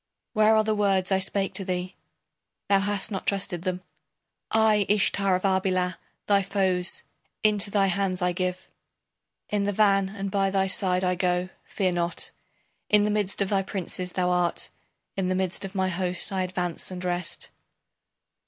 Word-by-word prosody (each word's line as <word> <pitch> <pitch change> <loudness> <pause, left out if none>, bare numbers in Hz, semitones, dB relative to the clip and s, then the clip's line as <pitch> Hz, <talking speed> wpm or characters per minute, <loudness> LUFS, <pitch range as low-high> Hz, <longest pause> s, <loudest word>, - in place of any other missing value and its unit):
Where 215 0 +5
are 215 - +4
the 215 0 0
words 195 -3 +1
I 190 - +3
spake 195 +1 0
to 195 - -5
thee? 180 0 -3 0.7
Thou 200 -1 +5
hast 205 +1 +1
not 195 - -4
trusted 195 -3 0
them. 185 0 -3 0.7
I, 215 -2 +3
Ishtar 200 -2 +2
of 185 - -3
Arbela, 185 -2 +1 0.3
thy 200 -1 +4
foes 190 -2 0 0.4
Into 210 -1 +4
thy 200 -1 +2
hands 190 -1 0
I 180 0 +1
give 180 +1 -3 0.8
In 205 -1 0
the 205 - +1
van 195 -1 +3
and 195 -1 -5
by 195 -1 +1
thy 195 0 +1
side 185 -1 +1
I 180 0 +2
go, 180 0 0 0.2
fear 190 -3 -1
not 175 0 -2 0.6
In 210 -1 +5
the 210 - +1
midst 205 -1 +1
of 195 - -4
thy 195 -2 +2
princes 185 -1 -4
thou 180 -1 +1
art. 180 -1 0 0.4
In 190 -2 -1
the 185 - 0
midst 185 0 -1
of 195 +1 -8
my 190 -1 +1
host 180 +1 0
I 190 -1 -1
advance 180 -2 -2
and 185 -1 -6
rest. 175 -2 -2
190 Hz, 170 wpm, -26 LUFS, 180-200 Hz, 0.8 s, Where